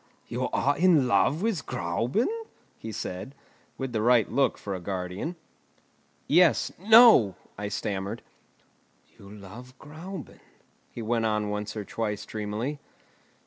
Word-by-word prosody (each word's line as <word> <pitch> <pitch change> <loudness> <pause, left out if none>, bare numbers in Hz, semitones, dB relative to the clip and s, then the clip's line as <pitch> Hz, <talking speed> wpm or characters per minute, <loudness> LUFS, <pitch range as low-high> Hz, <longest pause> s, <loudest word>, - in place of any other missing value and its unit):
you - - -2
are 140 +2 +1
in 165 -7 +5
love 150 +7 +2
with 220 -9 -1
Gräuben?" 120 - -1 0.5
he 110 - -6
said, 105 +4 -6 0.4
with 135 -2 -4
the 110 - 0
right 120 -1 +4
look 140 -1 +2
for 100 - -5
a 95 - -4
guardian. 95 - -4 0.9
"Yes; 170 +1 +4
no!" 220 - +7 0.2
I 105 - -4
stammered. 100 -1 -4 0.9
"You 100 - -14
love 105 +6 -12
Gräuben," 160 +2 -9 0.5
he 115 - -7
went 115 0 0
on 105 -1 -1
once 105 +1 -4
or 105 - -4
twice 105 -2 -3
dreamily. 110 +8 -4
115 Hz, 130 wpm, -27 LUFS, 105-145 Hz, 0.9 s, no